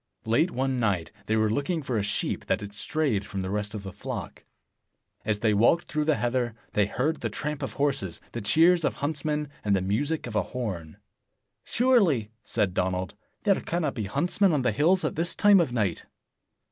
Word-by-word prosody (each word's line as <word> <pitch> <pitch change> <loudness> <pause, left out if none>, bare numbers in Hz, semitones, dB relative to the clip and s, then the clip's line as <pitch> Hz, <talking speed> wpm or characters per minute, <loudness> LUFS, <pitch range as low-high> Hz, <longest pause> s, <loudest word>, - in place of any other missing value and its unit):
Late 115 +10 +3
one 130 -4 -1
night, 95 -9 0 0.2
they 110 - +2
were 110 -1 +2
looking 150 +6 -1
for 130 -3 -2
a 105 - +2
sheep 100 +1 -1
that - - +1
had 100 0 -7
strayed 125 -2 0
from 100 -1 -5
the 95 - -3
rest 105 +1 -2
of 100 - -5
the 95 -1 -7
flock. 100 - -6 0.8
As 105 -1 -1
they 110 -2 +3
walked 120 +11 +4
through 150 0 0
the 155 -1 +3
heather, 120 -2 -1 0.2
they 105 -1 +3
heard 145 +9 -1
the - - -1
tramp 150 -1 -3
of - - -4
horses, 135 - -1
the 120 - -5
cheers 165 - +4
of - - 0
huntsmen, 150 +1 -2 0.2
and 100 -1 +2
the - - +2
music 140 +12 -1
of 120 -3 -6
a 105 - +3 0.2
horn. 90 -10 -4 0.7
"Surely, 195 - +2
" 115 - -50
said 105 -5 0
Donald, 90 0 -1 0.3
"there 200 -3 +3
cannot 165 -4 -1
be 110 -5 -3
huntsmen 175 - +2
on 140 -4 +1
the 125 - +2
hills 170 - +3
at - - -1
this 170 +1 0
time 205 -1 +6
of 165 -7 +1
night." 105 -8 -1
120 Hz, 200 wpm, -27 LUFS, 105-155 Hz, 0.8 s, time